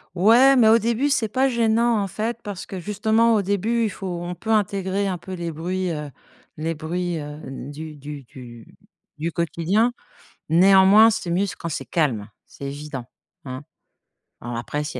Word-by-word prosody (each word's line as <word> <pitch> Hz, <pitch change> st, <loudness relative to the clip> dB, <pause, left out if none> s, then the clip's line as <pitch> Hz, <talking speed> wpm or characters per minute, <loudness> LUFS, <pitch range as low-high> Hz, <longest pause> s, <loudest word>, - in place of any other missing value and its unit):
Ouais, 235 Hz, +9 st, +6 dB
mais 230 Hz, -4 st, +5 dB
au 230 Hz, +1 st, +6 dB
début, 235 Hz, +6 st, 0 dB
c'est 225 Hz, -5 st, +1 dB
pas 265 Hz, +5 st, +1 dB
gênant, 230 Hz, -1 st, +2 dB
en 195 Hz, -, -1 dB
fait, 220 Hz, +4 st, -3 dB
parce 205 Hz, -4 st, -6 dB
que 190 Hz, -, -7 dB
justement, 220 Hz, +4 st, +2 dB
au 205 Hz, -, +1 dB
début, 210 Hz, +4 st, 0 dB
il 215 Hz, -, +1 dB
faut 195 Hz, -1 st, -7 dB, 0.2 s
on 175 Hz, +1 st, -4 dB
peut 220 Hz, +6 st, -9 dB
intégrer 200 Hz, -2 st, +1 dB
un 180 Hz, -3 st, -3 dB
peu 190 Hz, +1 st, -8 dB
les 170 Hz, -2 st, -4 dB
bruits, 180 Hz, +3 st, -2 dB
heu, 150 Hz, -2 st, -5 dB, 0.5 s
les 165 Hz, +2 st, -2 dB
bruits, 170 Hz, +2 st, -3 dB
heu, 150 Hz, 0 st, -7 dB, 0.3 s
du 155 Hz, +1 st, -8 dB
du 145 Hz, -1 st, -8 dB
du 120 Hz, -2 st, -12 dB, 0.5 s
du 165 Hz, +2 st, -2 dB
quotidien. 170 Hz, +8 st, +1 dB, 0.6 s
Néanmoins, 190 Hz, +6 st, +7 dB
c'est 210 Hz, -5 st, -3 dB
mieux 185 Hz, +4 st, +1 dB
quand 170 Hz, -, -5 dB
c'est 145 Hz, -4 st, -3 dB
calme, 120 Hz, -8 st, -1 dB, 0.2 s
c'est -, -, -13 dB
évident. 140 Hz, -3 st, -6 dB, 0.4 s
Hein? 130 Hz, +1 st, -7 dB, 0.8 s
Alors 120 Hz, 0 st, -6 dB
après, 145 Hz, +6 st, -3 dB
s'il 135 Hz, -4 st, -5 dB
185 Hz, 175 wpm, -23 LUFS, 150-220 Hz, 0.8 s, Néanmoins